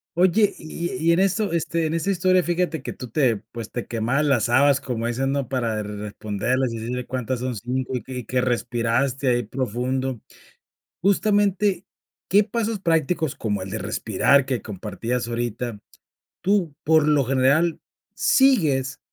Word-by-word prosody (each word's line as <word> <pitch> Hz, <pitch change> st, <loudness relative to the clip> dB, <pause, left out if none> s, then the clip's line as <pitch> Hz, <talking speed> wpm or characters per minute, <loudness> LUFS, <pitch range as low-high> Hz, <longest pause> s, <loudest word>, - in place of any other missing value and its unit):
Oye, 185 Hz, +4 st, +4 dB
y 170 Hz, +3 st, -5 dB, 0.2 s
y-y -, -, +6 dB
en 170 Hz, -, +2 dB
esto, 195 Hz, +1 st, +1 dB
este, 165 Hz, 0 st, 0 dB
en 160 Hz, -, -2 dB
esa 165 Hz, +4 st, 0 dB
historia 185 Hz, -1 st, +3 dB
fíjate 175 Hz, -4 st, -1 dB
que -, -, -5 dB
tú 125 Hz, -, -9 dB
te 120 Hz, -3 st, +2 dB
pues 115 Hz, -2 st, -7 dB
te 120 Hz, -, -5 dB
quemabas 120 Hz, +5 st, 0 dB
las 130 Hz, -6 st, +2 dB
habas 140 Hz, +3 st, +4 dB
como 115 Hz, -3 st, -3 dB
dicen, 130 Hz, +3 st, -1 dB
¿no?, 140 Hz, -3 st, -2 dB
para 115 Hz, -5 st, -1 dB
responderlas 105 Hz, +4 st, -2 dB
y 115 Hz, -, -4 dB
decirle 125 Hz, +3 st, -4 dB
cuántas 125 Hz, 0 st, -2 dB
son 125 Hz, 0 st, -3 dB
5 125 Hz, +4 st, -3 dB
y 125 Hz, -, -3 dB
y 125 Hz, -3 st, -6 dB
que 130 Hz, +3 st, 0 dB
respiraste 120 Hz, +2 st, 0 dB
ahí 120 Hz, 0 st, +2 dB
profundo. 130 Hz, 0 st, -2 dB, 0.8 s
Justamente, 200 Hz, -1 st, +2 dB, 0.4 s
¿qué 205 Hz, +2 st, +5 dB
pasos 225 Hz, 0 st, -2 dB
prácticos 165 Hz, -3 st, +1 dB
como 105 Hz, -4 st, -2 dB
el 95 Hz, -, -7 dB
de 110 Hz, -, -3 dB
respirar 135 Hz, +8 st, +2 dB
que 130 Hz, -3 st, -2 dB
compartías 110 Hz, +5 st, -4 dB
ahorita, 120 Hz, -1 st, -3 dB, 0.6 s
tú, 185 Hz, -5 st, +1 dB
por 160 Hz, -1 st, +4 dB
lo 150 Hz, -3 st, +3 dB
general, 140 Hz, +6 st, +2 dB, 0.3 s
sigues 150 Hz, -, +3 dB
130 Hz, 155 wpm, -23 LUFS, 120-170 Hz, 0.8 s, y-y